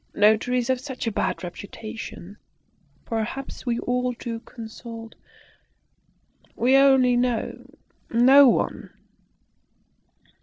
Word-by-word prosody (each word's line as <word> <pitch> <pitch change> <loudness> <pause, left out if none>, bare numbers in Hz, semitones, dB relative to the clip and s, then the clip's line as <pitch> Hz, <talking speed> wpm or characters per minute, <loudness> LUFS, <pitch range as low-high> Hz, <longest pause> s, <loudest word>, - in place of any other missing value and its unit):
Notaries 235 +4 +2
have 260 -1 +1
such 265 -3 -6
a 225 - 0
bad 200 - -2
reputation. 200 +1 -8 0.7
Perhaps 235 +4 -5
we 235 -1 +1
ought 250 0 -1
to 230 -2 -4
consult 225 -1 -10 1.4
we 255 +3 +3
only 265 -2 +5
know 245 -2 -2 0.4
no 260 +4 +7
one." - - -1
240 Hz, 90 wpm, -24 LUFS, 225-255 Hz, 1.4 s, no